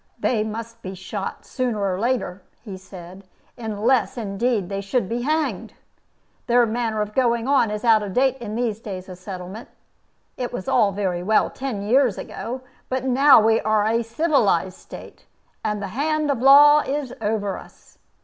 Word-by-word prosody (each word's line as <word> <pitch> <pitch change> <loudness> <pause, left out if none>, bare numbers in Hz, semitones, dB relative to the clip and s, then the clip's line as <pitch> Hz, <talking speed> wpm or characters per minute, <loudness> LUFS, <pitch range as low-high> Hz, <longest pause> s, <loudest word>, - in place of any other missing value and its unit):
"They 220 -4 0
must 230 +1 -7
be 190 0 -7
shot, 195 +2 -6
sooner 250 -4 -2
or 190 -2 -1
later," 230 -5 -1 0.2
he 205 -5 -7
said, 185 0 -12 0.3
"unless, 235 +3 0
indeed, 215 -1 -1
they 195 +1 -4
should 200 +2 -1
be 235 +3 -2
hanged. 310 +4 -2 0.7
Their 240 0 +4
manner 220 -1 -1
of 210 0 -9
going 235 -1 +1
on 270 -5 +3
is 210 +2 -4
out 225 -2 +5
of 205 -2 -5
date 265 +2 +2
in 215 -3 -6
these 230 -3 -1
days 190 -4 -7
of 185 -1 -10
settlement. 185 +3 -8 0.7
It 250 -1 -3
was 215 -7 -6
all 215 -5 +3
very 190 -3 -2
well 215 +4 +2
ten 250 -7 -4
years 245 0 +3
ago. 255 +3 -6 0.3
But 260 0 -2
now 265 +1 +6
we 225 +1 +3
are 215 -1 +1
a 230 +2 +1
civilized 230 - +1
State, - - -12 0.4
and 210 -1 -2
the 195 - -4
hand 300 +6 0
of 255 -4 -2
law 290 +3 +8
is 285 -2 -3
over 205 -2 -1
us. - - -18
225 Hz, 170 wpm, -22 LUFS, 200-255 Hz, 0.7 s, law